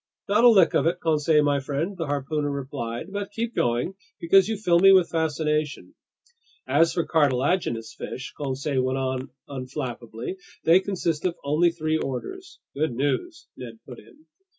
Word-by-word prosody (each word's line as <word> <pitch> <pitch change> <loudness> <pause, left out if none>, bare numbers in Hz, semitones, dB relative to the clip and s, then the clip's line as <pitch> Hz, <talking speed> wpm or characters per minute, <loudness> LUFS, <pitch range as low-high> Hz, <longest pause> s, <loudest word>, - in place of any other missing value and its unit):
"Not 210 +3 +3
a 245 - +9
lick 195 -7 +5
of - - +2
it, 175 +1 0
Conseil 155 -1 +2
my 145 -1 +2
friend," 145 +8 -3
the 165 -4 -4
harpooner 145 +1 -2
replied. 135 +2 -5
"But 200 -1 -3
keep 230 +2 -3
going, 120 +9 0 0.3
because 195 +4 +4
you 220 - -1
fill 175 -5 +3
me 195 +2 +7
with 185 -3 +5
fascination." 155 -2 -1 0.7
"As 165 0 +3
for 170 - -1
cartilaginous 135 -5 +1
fish," 130 - -7
Conseil 140 -1 -2
went 130 +1 -1
on 130 0 -2 0.2
unflappably, 130 +1 -6 0.3
"they 170 +3 +6
consist 175 -5 -2
of 175 -2 0
only 155 +5 +3
three 160 -1 -1
orders." 370 - -6 0.2
"Good 145 -4 -1
news," 325 - -2
Ned 115 -3 -9
put 125 -3 -10
in. 310 +1 -20
155 Hz, 160 wpm, -25 LUFS, 135-180 Hz, 0.7 s, a